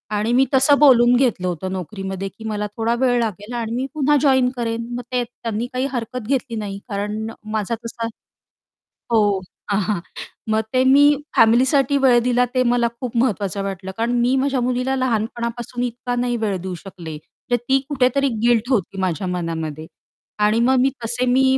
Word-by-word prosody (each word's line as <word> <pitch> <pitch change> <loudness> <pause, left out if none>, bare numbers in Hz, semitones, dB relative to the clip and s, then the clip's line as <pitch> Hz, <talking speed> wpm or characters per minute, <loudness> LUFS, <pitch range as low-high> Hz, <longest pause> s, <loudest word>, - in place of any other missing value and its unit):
आणि 210 +3 0
मी 260 +2 +5
तसं 270 +2 +5
बोलून 245 -4 +6
घेतलं 240 -8 +1
होतं 180 +1 -3
नोकरीमध्ये 190 +1 -5
की 220 - -14
मला 210 -1 -2
थोडा 225 +1 +1
वेळ 250 -2 +3
लागेल 215 0 -3
आणि 230 -2 -3
मी 255 +2 -1
पुन्हा 295 -1 +2
जॉइन 260 -3 +4
करेन. 230 -1 -2
मग 245 - -3
ते 250 -1 +1
त्यांनी 230 -1 -5
काही 255 +1 0
हरकत 245 -2 -4
घेतली 255 -2 -1
नाही. 205 -2 -4
कारण 210 +2 -3 0.2
माझा 215 +1 -1
तसा 230 0 -4 1.0
हो. 205 -4 +3 0.3
हां, 200 - +2
हां, 205 -1 -1 0.5
मग 220 0 +2
ते 255 0 +4
मी 270 +2 +6 0.3
फॅमिलीसाठी 260 +5 +4
वेळ 260 -3 +5
दिला 250 0 +3
ते 255 -1 +3
मला 240 -1 +2
खूप 250 -2 -5
महत्त्वाचं 205 -5 0
वाटलं. 190 -1 -5
कारण 230 +1 0
मी 250 +2 +2
माझ्या 270 0 +1
मुलीला 250 +2 0
लहानपणापासून 235 0 -2
इतका 245 0 -3
नाही 245 0 0
वेळ 210 -4 -1
देऊ 185 0 -5
शकले, 170 -4 -9 0.3
तर - - +5
ती 255 +3 +1
कुठेतरी 275 0 +2
गिल्ट 235 0 +2
होती 200 -6 0
माझ्या 185 +1 -1
मनामध्ये 165 -3 -3 0.6
आणि 210 +2 +3
मग 255 +3 +3
मी 265 - +4
तसे 240 +2 -1
मी 255 +2 +3
235 Hz, 175 wpm, -21 LUFS, 205-255 Hz, 1.0 s, बोलून